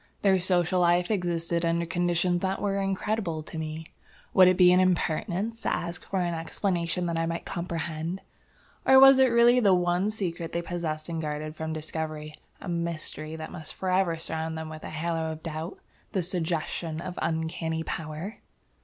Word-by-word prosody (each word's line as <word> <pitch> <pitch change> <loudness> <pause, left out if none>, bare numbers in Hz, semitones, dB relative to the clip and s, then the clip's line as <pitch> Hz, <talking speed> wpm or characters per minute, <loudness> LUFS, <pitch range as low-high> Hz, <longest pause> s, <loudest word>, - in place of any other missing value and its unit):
Their 190 -2 +5
social 180 0 +2
life 175 +2 +3
existed 170 -3 0
under 170 0 +1
conditions 175 0 +1
that 190 0 -1
were 200 -1 0
incredible 195 -4 -1
to 160 - -7
me. 160 0 -5 0.5
Would 185 -2 +8
it 185 0 +4
be 180 -1 +7
an 180 - +5
impertinence 185 +4 0
to - - 0
ask 170 0 -3
for 190 -2 -1
an 175 -1 0
explanation 170 +1 -1
that 170 -1 -1
I 165 - 0
might 170 0 -3
comprehend? 170 0 -4 0.6
Or 265 0 +7
was 270 0 +9
it 265 - +7
really 240 +1 +5
the 200 -6 +5
one 180 +3 +1
secret 175 -6 -3
they 170 - -1
possessed 160 -3 -3
and 165 -1 -3
guarded 155 0 -4
from 160 0 -4
discovery, 155 -1 -4 0.3
a - - -9
mystery 165 -2 -3
that 160 0 -7
must 160 -4 -7
forever 185 -2 +1
surround 160 0 -3
them 160 0 -5
with 155 0 -9
a - - -6
halo 160 0 -2
of 155 - -11
doubt, 160 +2 -5 0.4
the 190 -4 +1
suggestion 165 -2 -2
of 180 +1 -6
uncanny 160 0 -1
power? 160 +6 -5
170 Hz, 175 wpm, -27 LUFS, 160-185 Hz, 0.6 s, was